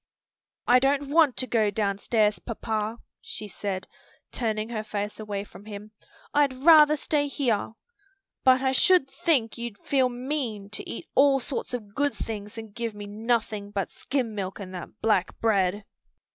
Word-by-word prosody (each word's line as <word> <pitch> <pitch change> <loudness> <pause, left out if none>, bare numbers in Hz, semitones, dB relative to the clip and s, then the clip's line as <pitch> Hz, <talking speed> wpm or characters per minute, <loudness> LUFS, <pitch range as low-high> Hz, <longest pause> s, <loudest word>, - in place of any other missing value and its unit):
"I 250 +1 +6
don't 275 +1 +1
want 310 -5 +4
to 255 - 0
go 220 -4 +2
downstairs, 210 +1 +1
papa," 220 -1 -3 0.2
she 210 - -5
said, 195 -1 -4 0.4
turning 220 -2 -2
her 220 -2 -3
face 210 0 -4
away 205 -2 -4
from 205 0 -14
him. 210 0 -9 0.4
"I'd 290 -2 +3
rather 305 +2 +7
stay 290 0 0
here. 245 -7 -1 0.7
But 260 0 +5
I 265 - +3
should 355 +2 +4
think 265 -6 +1
you'd 235 -3 -5
feel 260 +3 +1
mean 245 -5 -3
to - - -5
eat - - -6
all 275 0 +5
sorts 255 -1 -3
of 210 -4 -8
good 285 +3 0
things 210 -1 -6
and 220 -2 -8
give 230 -2 -4
me 205 0 -7
nothing 215 -1 -1
but 200 -2 -3
skim 250 -4 -2
milk 195 -1 -4
and 190 -2 -8
that 180 +4 -8
black 210 -5 +1
bread." 200 -2 +1
225 Hz, 160 wpm, -26 LUFS, 205-265 Hz, 0.7 s, rather